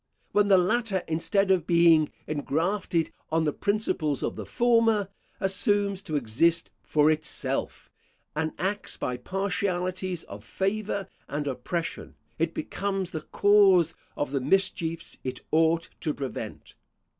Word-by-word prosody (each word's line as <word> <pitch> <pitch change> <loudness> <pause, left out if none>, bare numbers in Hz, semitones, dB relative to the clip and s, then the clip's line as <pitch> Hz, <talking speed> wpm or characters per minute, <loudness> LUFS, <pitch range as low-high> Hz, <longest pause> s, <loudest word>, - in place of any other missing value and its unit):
When 205 0 +3
the 195 -2 +6
latter, 200 0 +1
instead 190 +5 +1
of 180 -4 +2
being 170 -3 +5 0.2
ingrafted 165 +4 -1 0.2
on 160 0 +2
the 150 -2 0
principles 190 -9 0
of - - -2
the - - -7
former, 230 -4 +3 0.3
assumes 200 0 +1
to 160 -6 -4
exist 145 +7 +1
for 150 0 +3
itself, 155 0 -2 0.4
and 160 0 0
acts 200 +3 -2
by 125 -1 -2
partialities 185 +2 -2
of 100 +1 -10
favour 195 - -2 0.2
and 145 +1 -3
oppression, 145 +6 -4 0.2
it - - 0
becomes 195 -2 -2
the 155 - -4
cause 190 -3 +4 0.2
of 145 - -2
the 140 -2 0
mischiefs 165 +1 0
it 130 -1 -4
ought 165 +1 +3
to 155 -3 -2
prevent. 135 -3 -6
175 Hz, 130 wpm, -27 LUFS, 155-200 Hz, 0.4 s, the